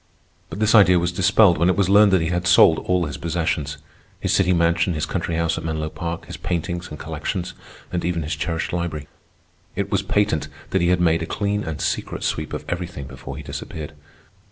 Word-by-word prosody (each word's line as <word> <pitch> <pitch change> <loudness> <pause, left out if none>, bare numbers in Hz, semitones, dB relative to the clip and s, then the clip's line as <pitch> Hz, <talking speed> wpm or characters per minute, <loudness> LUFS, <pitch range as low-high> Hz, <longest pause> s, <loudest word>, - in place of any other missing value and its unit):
But - - -7
this 110 0 +3
idea 95 -5 +7
was 85 0 0
dispelled 95 -1 +4
when 85 +2 +3
it 95 - +2
was 100 -3 +3
learned 100 +1 +6
that 90 -3 +4
he 80 - -1
had 90 +1 -1
sold 85 -2 +6
all 90 -1 0
his 75 - -5
possessions,—his 75 -3 -3
city 95 -2 +3
mansion, 85 0 +2
his 75 - -1
country 85 - -2
house 85 0 0
at - - -9
Menlo 80 -1 -2
Park, 85 0 -5
his - - -8
paintings, 85 0 -3
and 75 - -8
collections, 80 +4 -4 0.4
and 90 - -2
even 85 -2 -1
his 75 +2 -3
cherished 80 +3 -3
library. 80 -4 -3 0.7
It - - -2
was - - +2
patent 100 -8 0 0.2
that 95 - +2
he 85 - +2
had 90 0 +2
made 85 -1 +3
a 80 - -3
clean 105 0 -1
and 80 -2 -5
secret - - -2
sweep - - -2
of - - -5
everything 85 -6 -4
before 65 0 -9
he - - -7
disappeared. 75 -1 -7
85 Hz, 205 wpm, -22 LUFS, 80-90 Hz, 0.7 s, idea